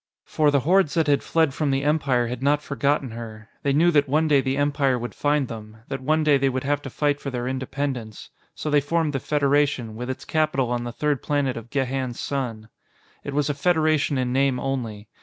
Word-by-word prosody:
For 150 -1 +2
the 140 -2 +2
hordes 175 0 +3
that 165 -2 +3
had 145 -2 +2
fled 160 -4 +1
from 150 0 -1
the 135 0 0
Empire 140 -5 +2
had 120 +1 -5
not 145 +2 +2
forgotten 140 -2 0
her; 110 -1 -9
they 140 - +1
knew 165 +5 +4
that 145 -3 +3
one 155 +3 +2
day 145 -3 +4
the 135 +1 -1
Empire 140 -2 +1
would 120 0 -5
find 145 -2 +1
them, 110 -2 -9
that 135 - -4
one 155 +4 +1
day 145 -2 +4
they 135 0 +2
would 130 0 -2
have 145 +1 0
to 135 - -7
fight 145 +2 0
for 140 - -4
their 125 -2 -3
independence. 130 -3 -4 0.2
So 150 - -4
they 145 -1 +4
formed 160 +1 0
the 135 - -1
Federation, 140 -5 +1
with 125 +3 -5
its 130 - -5
capital 155 -6 0
on 120 0 -1
the 120 - -4
third 145 +3 -1
planet 145 -3 0
of 115 0 -8
Gehan's 130 -2 -2
Sun. 115 -6 -4 0.5
It 140 - -5
was 145 -1 +1
a 145 - 0
federation 155 -2 +2
in 125 -1 -1
name 135 -1 +2
only. 115 -6 -4
140 Hz, 220 wpm, -24 LUFS, 125-145 Hz, 0.5 s, knew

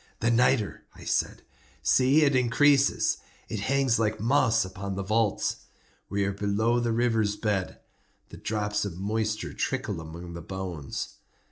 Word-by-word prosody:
"The 115 +1 +2
nitre!" 115 -2 +2
I - - -12
said: - - -1 0.4
"see, 135 +4 +4
it 140 -2 +3
increases. 135 +3 +3 0.3
It 110 - -3
hangs 135 +2 +2
like 110 -1 0
moss 115 -2 +3
upon 95 +1 -5
the 100 - -3
vaults. 110 +1 +1 0.5
We 100 0 0
are 100 - -1
below 105 +4 +1
the 120 -1 0
river's 115 -3 +1
bed. 105 -4 -1 0.5
The - - -10
drops 105 -1 -1
of 95 -5 -5
moisture 110 +2 -2
trickle 110 -10 -2
among 85 +2 -8
the 85 - -7
bones. 90 -5 -5
110 Hz, 145 wpm, -27 LUFS, 100-120 Hz, 0.5 s, see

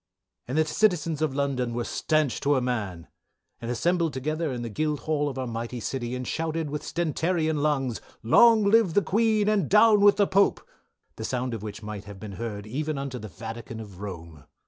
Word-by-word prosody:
"And 130 +5 -2
the 155 - +4
citizens 165 -4 +1
of 150 -4 0
London 130 -4 -1
were 120 - -1
stanch 155 +1 0
to 145 +1 +2
a - - +3
man, 105 -9 -3 0.5
and 115 - -5
assembled 170 +5 +1
together 155 +4 -2
in 120 -2 -4
the 115 - -4
Guildhall 150 +3 -1
of 135 - -7
our 130 - -2
mighty 120 +1 -4
City 120 +1 -3
and 125 -1 -5
shouted 160 -2 -2
with 150 - -3
stentarian 160 -1 -1
lungs, 135 -6 0 0.2
long 225 - +6
live 200 -4 +4
the 205 - +4
Queen 215 0 +2
and 205 -7 +2
down 210 +1 +6
with 205 0 +6
the 205 - +4
Pope, 195 +1 +2 0.5
the 110 - -5
sound 125 +1 -2
of 110 - -4
which 105 0 -7
might 105 -1 -6
have 100 -1 -10
been 105 0 -7
heard 105 0 -5
even 150 +6 -3
unto 135 -2 -4
the 110 - -7
vatican 115 +2 -8
of 100 -5 -10
Rome. 85 -7 -8
135 Hz, 195 wpm, -26 LUFS, 115-165 Hz, 0.5 s, long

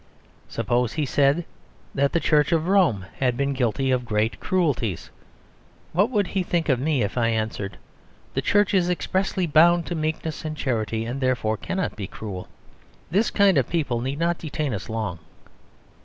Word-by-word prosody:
Suppose 120 +1 0
he 155 -2 0
said 140 +5 +2 0.5
that 140 0 +2
the 170 - +2
Church 150 0 +2
of 165 0 +1
Rome 175 - +3
had 125 -2 +1
been 140 0 0
guilty 130 +1 0
of 125 -1 +1
great 110 0 -1
cruelties. 145 - -1 0.8
What 200 +7 +3
would 210 -6 +1
he 190 +1 -1
think 170 -2 -1
of 130 -3 +3
me 140 -2 +1
if 105 +5 -2
I 115 - +2
answered, 110 -3 -2 0.6
"The - - 0
Church 205 0 +2
is 180 -2 +3
expressly 185 +1 0
bound 170 +2 +5
to - - -4
meekness 160 0 -3
and 155 -1 -4
charity; 115 -4 -1
and 125 +4 -4
therefore 120 -4 +1
cannot 185 - -3
be 100 -3 -5
cruel"? 95 -4 -7 0.6
This 205 +6 +2
kind 195 -7 +4
of 130 - -1
people 140 -8 0
need 135 +3 -3
not 170 +1 0
detain 150 -4 -3
us 100 +1 -5
long. 110 -6 -3
140 Hz, 170 wpm, -24 LUFS, 115-170 Hz, 0.8 s, bound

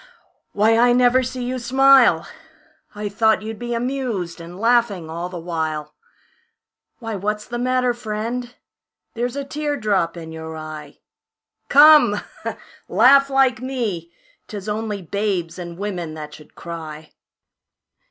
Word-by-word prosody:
Why, 220 +2 +3
I 240 0 +5
never 250 +1 +4
see 255 0 -4
you 255 +1 -3
smile, 270 +2 +5 0.7
I 210 0 -4
thought 220 +1 +2
you'd 220 0 -6
be 240 0 -3
amused, 235 -9 -3
and 175 +2 -10
laughing 230 -8 +1
all 170 +2 -4
the 180 - -7
while. 160 -3 -4 1.0
Why, 225 -2 -6
what's 210 +2 -3
the 240 0 -5
matter, 250 0 +1
friend? 235 +2 -4 0.6
There's 245 +2 -3
a 280 - -3
tear 295 +1 -3
drop 190 -7 0
in 160 -1 -8
you 160 0 -7
eye, 155 -2 -9 0.7
Come, 295 -8 +7 0.7
laugh 275 +2 +6
like 270 -2 +2
me. 220 -11 -3 0.4
'Tis 205 -1 -7
only 210 -2 -3
babes 185 -2 -2
and 170 -1 -7
women 180 -6 -4
that 150 -1 -8
should 150 0 -15
cry. 160 -2 -8
215 Hz, 135 wpm, -21 LUFS, 170-245 Hz, 1.0 s, Come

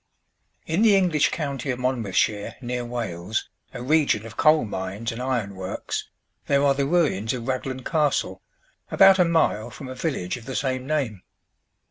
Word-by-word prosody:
In 165 +6 0
the 220 -3 +6
English 180 -6 +3
county 140 -4 -3
of 125 - 0
Monmouthshire, 110 -5 0
near 125 -1 -3
Wales, 110 -5 -3 0.2
a 120 - -7
region 140 -6 +2
of 115 0 -10
coal 155 -2 +4
mines 100 +3 -4
and 115 +2 -6
iron 125 -6 -1
works, 95 -1 -5 0.4
there 140 0 +3
are 140 - +5
the 135 0 0
ruins 140 - +1
of 120 -2 -6
Raglan 130 0 -3
Castle, 150 -2 0 0.5
about 195 0 +6
a 180 - +6
mile 160 -10 +1
from 135 - -9
a 130 - -6
village 130 - -3
of 120 - -12
the 130 - -5
same 130 -2 -1
name. 135 -11 -1
130 Hz, 165 wpm, -24 LUFS, 110-150 Hz, 0.5 s, the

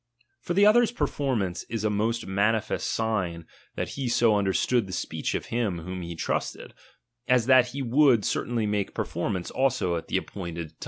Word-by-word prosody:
For 175 - -3
the 200 +1 +6
other's 230 +2 +5
performance 120 - -1
is 115 -2 -3
a 110 - +1
most 110 +3 -1
manifest 105 +3 0
sign 95 -7 -1 0.3
that - - -3
he 135 -2 -4
so 115 -2 +3
understood 100 +3 +1
the 95 - -7
speech - - -3
of - - -3
him 110 -7 0
whom 90 +2 -6
he 85 0 -6
trusted, - - -3 0.5
as 125 -2 +3
that 130 -1 +6
he 135 +3 -5
would 130 -3 +4
certainly 115 -3 -1
make 105 -1 -2
performance 90 0 -3
also 130 -10 +1
at 80 - -7
the - - 0
appointed 85 -4 -5
LIBERTY. 80 - -29
110 Hz, 175 wpm, -26 LUFS, 95-125 Hz, 0.5 s, the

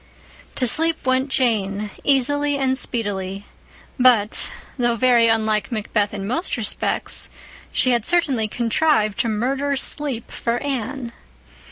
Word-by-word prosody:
To 255 - +2
sleep 320 +6 +2
went 260 +2 +1
Jane 210 -5 0
easily 290 +1 +2
and 265 -1 +1
speedily; 200 -6 -3 0.5
but, 235 -5 +3 0.3
though 240 -2 +1
very 240 -1 +4
unlike 215 -2 +1
MacBeth 210 -2 -1
in 200 -1 -5
most 255 - -2
respects, 220 -3 -2 0.4
she 255 - +2
had 240 -2 +2
certainly 275 -8 +2
contrived 230 -1 +1
to - - +1
murder 270 +6 0
sleep 270 -3 -2
for 235 0 -1
Anne. 260 -2 -3
240 Hz, 125 wpm, -21 LUFS, 215-270 Hz, 0.5 s, very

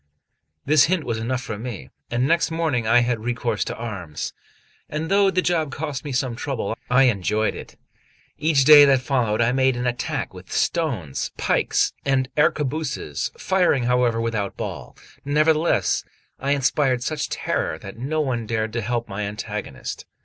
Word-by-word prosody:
This 150 -1 +5
hint 175 -1 0
was 115 -4 -2
enough 125 +3 -2
for 105 -2 -5
me, 110 - -7 0.2
and 120 +2 +1
next 165 +1 +2
morning 160 -9 -1
I 120 +2 +5
had 120 -1 0
recourse 120 -2 -1
to - - -4
arms; 100 -10 -5 0.6
and 155 +3 -3
though 200 0 +5
the 185 -1 +1
job 160 -5 0
cost 145 -1 -4
me 145 - -5
some 125 -2 -1
trouble, 120 -4 -3
I 125 +2 +5
enjoyed 110 -2 +1
it. - - -10 0.6
Each 150 -3 +3
day 150 0 +10
that 135 -2 +4
followed, 125 -5 0
I 115 +1 +3
made 130 -1 +2
an 125 - -2
attack 125 0 -2
with - - -12
stones, 120 - -1
pikes - - +1
and 130 -2 +1
arquebuses, 150 - 0
firing, 180 -9 +2
however, 125 -1 +2
without 110 -4 -2
ball; - - -6 0.3
nevertheless, 155 +3 +2 0.4
I 140 +1 +1
inspired 135 -2 +1
such 150 +2 -2
terror - - -2
that - - -10
no 155 +5 -1
one 120 -6 -2
dared 110 -1 -1
to 115 - -1
help 120 +2 -2
my 100 0 -5
antagonist. 105 -8 -6
125 Hz, 165 wpm, -23 LUFS, 115-150 Hz, 0.6 s, day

